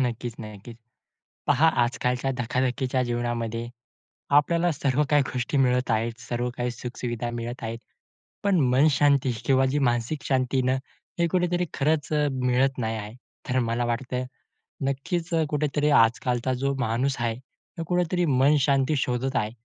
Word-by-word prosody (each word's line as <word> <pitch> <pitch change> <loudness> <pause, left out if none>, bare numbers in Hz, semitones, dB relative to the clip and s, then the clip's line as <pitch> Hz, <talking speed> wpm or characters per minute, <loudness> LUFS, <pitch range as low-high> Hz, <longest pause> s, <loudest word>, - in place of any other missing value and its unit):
नक्कीच 120 -1 -3
ना, 110 -1 -7
नक्कीच. 105 +3 -11 0.7
पहा 160 +5 +4 0.2
आजकालच्या 125 +2 -1
धक्काधक्कीच्या 130 +2 0
जीवनामध्ये, 120 -1 -2 0.7
आपल्याला 170 +3 +2
सर्व 140 -1 0
काही 145 -1 +5
गोष्टी 125 +3 -2
मिळत 125 0 +1
आहेत. 115 +1 +1
सर्व 120 0 -3
काही 120 0 -1
सुख-सुविधा 120 0 -4
मिळत 120 +1 -6
आहेत. 115 0 -3 0.7
पण 200 -3 +3
मनशांती 140 0 +3
किंवा 135 -1 +4
जी 140 +3 0
मानसिक 120 +5 -2
शांती 130 -1 +1
ना, 130 +1 +1 0.4
हे 170 - +3
कुठेतरी 180 +1 +1
खरंच 150 +2 0
अ, 150 -1 +2
मिळत 130 +1 +1
नाही 115 -3 -2
आहे. 105 0 -7 0.4
तर 130 0 +2
मला 120 +1 0
वाटतं 125 +1 -2 0.6
नक्कीच 165 +5 -2
अ, 160 -1 +3
कुठेतरी 150 0 0
आजकालचा 120 +2 +1
जो 140 0 +1
माणूस 130 +2 0
आहे, 115 -1 0 0.4
तो 165 - -3
कुठेतरी 180 0 +1
मनशांती 140 0 +3
शोधत 130 +1 -1
आहे. 105 -2 0
130 Hz, 145 wpm, -25 LUFS, 120-145 Hz, 0.7 s, काही